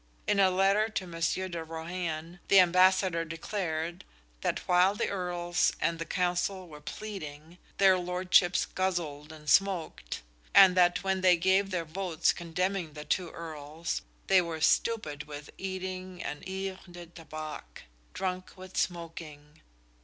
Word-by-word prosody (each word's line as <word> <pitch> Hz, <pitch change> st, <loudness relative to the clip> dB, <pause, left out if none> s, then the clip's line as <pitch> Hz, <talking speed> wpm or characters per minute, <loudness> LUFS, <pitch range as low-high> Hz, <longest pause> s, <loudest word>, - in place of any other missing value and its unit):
In 205 Hz, -, +2 dB
a 190 Hz, -1 st, +6 dB
letter 195 Hz, +4 st, +3 dB
to 200 Hz, -4 st, -3 dB
Monsieur 170 Hz, +2 st, -1 dB
de 170 Hz, -2 st, -5 dB
Rohan, 165 Hz, +1 st, -5 dB
the 195 Hz, -, +7 dB
Ambassador 185 Hz, -1 st, +4 dB
declared 165 Hz, 0 st, -3 dB, 0.4 s
that -, -, -2 dB
while 180 Hz, +2 st, +4 dB
the -, -, -1 dB
Earls 175 Hz, -2 st, 0 dB
and 165 Hz, 0 st, 0 dB
the 165 Hz, -, -4 dB
Counsel 180 Hz, +1 st, -1 dB
were 150 Hz, -2 st, -12 dB
pleading, 165 Hz, -3 st, -8 dB, 0.2 s
their 190 Hz, -2 st, +5 dB
lordships 180 Hz, 0 st, +3 dB
guzzled 165 Hz, -6 st, -2 dB
and 155 Hz, -1 st, -13 dB
smoked; 175 Hz, -, +1 dB, 0.3 s
and 190 Hz, -2 st, +9 dB
that 175 Hz, 0 st, +4 dB
when 190 Hz, -1 st, 0 dB
they 180 Hz, -1 st, +6 dB
gave 190 Hz, +3 st, +3 dB
their 175 Hz, -3 st, -2 dB
votes 170 Hz, 0 st, 0 dB
condemning 175 Hz, 0 st, -2 dB
the 150 Hz, 0 st, -8 dB
two 180 Hz, -3 st, 0 dB
Earls, 160 Hz, 0 st, -5 dB, 0.2 s
they 190 Hz, -1 st, +5 dB
were 165 Hz, -2 st, -4 dB
stupid 155 Hz, -5 st, +1 dB
with 145 Hz, 0 st, -8 dB
eating 185 Hz, -1 st, -5 dB
and 145 Hz, -, -5 dB
"yvres 190 Hz, 0 st, -4 dB
de 175 Hz, 0 st, -9 dB
tabac" 155 Hz, -, -9 dB, 0.3 s
drunk 185 Hz, 0 st, -4 dB
with 185 Hz, 0 st, -10 dB
smoking. 160 Hz, -3 st, -4 dB
175 Hz, 140 wpm, -30 LUFS, 160-185 Hz, 0.4 s, and